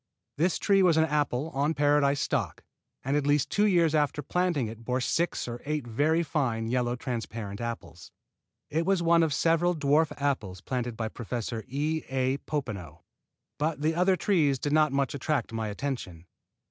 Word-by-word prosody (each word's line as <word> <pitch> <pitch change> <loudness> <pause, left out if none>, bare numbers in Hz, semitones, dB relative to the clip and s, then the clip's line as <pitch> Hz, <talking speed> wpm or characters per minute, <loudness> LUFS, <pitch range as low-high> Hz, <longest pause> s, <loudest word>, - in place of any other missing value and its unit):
This 170 +4 +1
tree 195 -1 +3
was 175 -4 +4
an 160 - +5
apple, 150 -1 -1
on 145 +4 0
Paradise 145 -1 +3
stock, - - -2 0.4
and 135 +2 0
at 150 - +2 0.3
two 210 +1 +3
years 170 -5 +3
after 150 -1 +1
planting 175 -4 0
it 110 +1 -8
bore 125 +2 -1
six 165 +5 -1
or 120 0 -6
eight 150 -2 -2
very 150 +8 +1
fine 130 -8 -1
Yellow 120 +1 0
Transparent 115 -4 -5
apples. 85 -8 -6 0.6
It 160 +2 +1
was 190 -1 +1
one 170 0 +5
of 160 -2 +2
several 165 +5 +2
dwarf 150 +1 +2
apples 120 -10 -1
planted 120 +1 -3
by 110 -1 -2
Professor 115 -1 -4
E. 150 +4 -1
A. 130 0 0
Popenoe, 105 - -5 0.6
but 150 0 -1
the 160 +1 +2
other 180 +3 +3
trees 160 -9 +2
did 145 +3 -2
not 155 -1 +4
much 140 -1 0
attract 140 -4 -2
my 110 -1 -2
attention. 105 -7 -5
140 Hz, 170 wpm, -28 LUFS, 120-160 Hz, 0.6 s, an